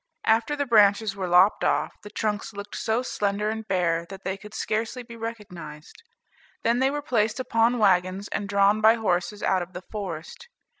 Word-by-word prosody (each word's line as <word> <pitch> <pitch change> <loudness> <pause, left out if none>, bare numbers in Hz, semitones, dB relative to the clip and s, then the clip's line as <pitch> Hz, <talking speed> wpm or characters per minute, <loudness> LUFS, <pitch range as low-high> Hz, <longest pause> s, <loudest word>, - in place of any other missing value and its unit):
After 225 +6 +2
the 285 -1 -1
branches 210 -3 +4
were 190 -2 -3
lopped 180 +3 +4
off, - - +1
the 210 - -10
trunks 210 0 -3
looked 205 +1 -8
so 230 +2 0
slender 210 -2 -1
and 220 0 -6
bare, 170 -3 0
that 195 0 -10
they 190 - -2
could 210 +2 -12
scarcely 225 +3 -2
be 235 0 -11
recognized. 205 - -8 0.6
Then 235 +2 +2
they 265 +1 +3
were 290 +1 -3
placed 225 -4 0
upon 235 -1 +2
wagons, 190 -1 +2
and 200 -1 -3
drawn 200 +1 +3
by 220 +1 +6
horses 205 -2 -1
out 190 -1 +2
of 175 +1 -7
the 180 - -7
forest. 195 - -6
210 Hz, 185 wpm, -25 LUFS, 190-225 Hz, 0.6 s, by